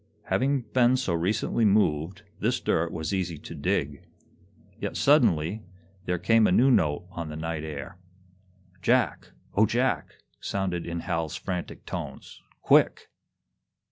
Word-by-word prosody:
Having 135 +1 +2
been 125 0 +4
so 125 -9 -1
recently 95 +7 0
moved, 100 -2 +2 0.2
this - - 0
dirt 80 +1 0
was 80 +3 -3
easy 90 -4 -2
to - - -10
dig. 70 0 -1 0.8
Yet, - - -4
suddenly, 85 +7 +3 0.4
there 90 - 0
came 110 +5 +4
a - - +1
new 130 +8 +5
note 75 - +2
on 85 -4 -5
the 75 - -6
night 80 0 -4
air. 75 +2 -7 0.8
"Jack, - - +1 0.3
O 110 +2 +4
Jack!" 125 +4 0 0.2
sounded 90 -4 -3
in 85 0 -3
Hal's 80 -2 -2
frantic 90 -2 -5
tones. - - -7 0.2
"Quick!" - - +3
90 Hz, 135 wpm, -27 LUFS, 80-110 Hz, 0.8 s, new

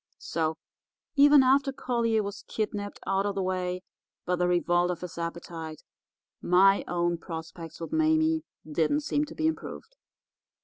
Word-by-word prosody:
"So, 160 -1 -2 0.6
even 285 -1 +7
after 275 +2 +3
Collier 235 -4 0
was 200 +1 -6
kidnapped 205 -2 -3
out 195 +1 +1
of 200 - -2
the 195 - -1
way 185 0 -2 0.4
by 180 - +1
the 180 0 +1
revolt 175 0 +2
of 180 - -3
his 180 -2 -7
appetite, 165 -2 -6 0.6
my 195 +3 +5
own 175 -1 0
prospects 165 -1 -8
with 165 - -6
Mame 315 0 +3 0.2
didn't 160 - +1
seem 295 0 0
to - - -11
be 315 - -1
improved. 450 +9 -4
195 Hz, 145 wpm, -28 LUFS, 175-275 Hz, 0.6 s, even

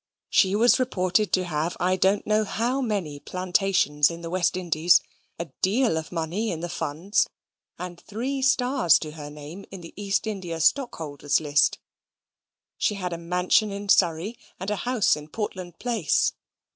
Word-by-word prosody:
She 190 0 +4
was 240 +5 +5
reported 205 -4 +1
to 185 - +3
have 165 -1 -2
I 185 +1 +2
don't 190 +2 +2
know 215 0 +2
how 240 +6 -1
many 195 - -2
plantations 180 -4 +1
in 170 0 -7
the 165 0 -6
West 180 0 +1
Indies; 175 -1 +4 0.4
a 170 - -3 0.2
deal 225 +1 +2
of 160 -1 -4
money 175 +6 -2
in 165 -4 -4
the 175 - -4
funds; 170 +8 0 0.5
and 175 -1 -7
three 255 +6 -3
stars 260 - +4
to 155 - -6
her 150 -1 -8
name 150 +6 -9
in 190 - -9
the 165 - -11
East 200 +1 -1
India 185 -6 -4
stockholders' 160 - +1
list. 145 -2 +2 1.0
She 210 - +1
had 180 -3 -3
a - - -3
mansion 180 +5 +2
in 200 0 -6
Surrey, 180 +5 +2 0.2
and 190 +3 -3
a - - +1
house 230 -5 +3
in 150 0 -9
Portland 185 -2 -5
Place. 225 - +1
185 Hz, 165 wpm, -25 LUFS, 165-210 Hz, 1.0 s, was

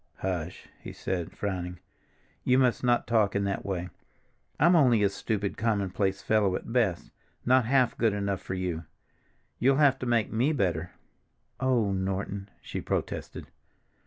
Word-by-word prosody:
"Hush," 90 -2 -4
he - - -9
said, 90 -3 -3
frowning. 90 -3 -3 0.7
"You 125 - +3
must 125 -3 +2
not 120 -1 +2
talk 110 -4 +2
in 100 - +1
that 100 0 -2
way. 90 -2 -3 0.7
I'm 170 +4 +5
only 125 -9 +5
a 100 - +4
stupid, 100 0 -3
commonplace 100 -3 0
fellow 105 -4 +2
at 115 - -6
best, 110 -9 0 0.3
not 130 -1 +4
half 130 0 +3
good 115 -2 +3
enough 100 -1 -2
for 95 - -5
you. 90 -3 -3 0.7
You'll 135 +3 +4
have 145 -3 +4
to 130 - -4
make 115 -3 +1
me 125 +8 +2
better." 90 - 0 0.7
"Oh, 125 -6 +2
Norton!" 95 +1 -3
she - - -5
protested. - - -3
100 Hz, 150 wpm, -28 LUFS, 95-120 Hz, 0.7 s, I'm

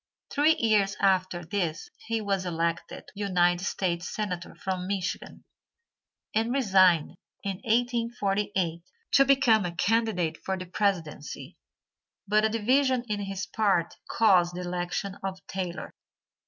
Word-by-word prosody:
Three 300 +2 +4
years 210 -3 +2
after 185 -3 +1
this 175 -3 -3 0.2
he 225 -1 -1
was 195 -2 -1
elected 170 -1 -2
United 180 -3 +1
States 180 -2 -1
senator 185 -5 -4
from 185 -1 -3
Michigan, 190 -2 -4 0.9
and 225 +2 +1
resigned 185 - +3 0.3
in 195 -2 -3
1848 215 -7 0 0.3
to 275 - +6
become 265 -6 +4
a 175 -1 -4
candidate 190 -6 +1
for 190 0 -2
the 185 - -6
presidency, 170 -6 -2 0.7
but 210 +1 +3
a 220 - +3
division 255 +3 +2
in 210 -1 -1
his 195 -1 -4
party 195 -6 +1
caused 180 -6 +4
the 180 - -4
election 180 +2 -3
of 190 -1 -3
Taylor. 185 -2 -5
195 Hz, 125 wpm, -27 LUFS, 175-220 Hz, 0.9 s, to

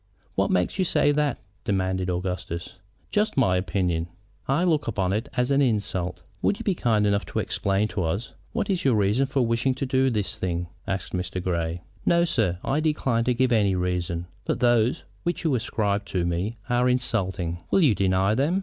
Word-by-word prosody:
"What - - +1
makes 90 - +1
you - - +4
say 155 -4 +3
that?" 145 -1 +1 0.3
demanded 95 -2 0
Augustus. 90 -1 -4 0.3
"Just 210 -5 +1
my 120 -8 +4
own - - +2
opinion." 90 -2 -1 0.4
"I 140 +6 +2
look 160 -5 +2
upon 95 -4 0
it 110 +7 -2
as 125 +2 +2
an 140 +1 +4
insult." 95 -7 -1 0.2
"Would 205 - +2
you 230 - -6
be 200 - +2
kind 110 -10 +2
enough 100 0 +2
to - - -5
explain 100 +2 0
to 100 - -2
us 95 +8 -2 0.2
what 225 -3 -1
is 185 -3 0
your 130 -4 +4
reason 105 +6 +2
for 130 -2 +1
wishing 115 +3 +1
to 135 - -2
do 130 0 +2
this 105 -5 -1
thing?" 85 -1 -2 0.2
asked 95 -1 -3
Mr. 90 0 -2
Grey. 85 -1 -2 0.2
"No, 170 0 +4
sir; 105 - 0
I 140 - +1
decline 135 -7 +1
to 125 -1 +2
give 130 +1 +2
any 100 -4 +3
reason. 90 -1 -1 0.2
But - - -1
those 120 +3 +3 0.2
which 175 +1 -2
you 160 -4 +2
ascribe 105 -4 0
to 90 -3 -1
me 90 +7 -1
are 125 +1 +2
insulting." 95 -9 -1
"Will 195 - +4
you 145 -9 +5
deny 95 +1 +2
them?" 145 - +2
105 Hz, 195 wpm, -25 LUFS, 90-130 Hz, 0.4 s, you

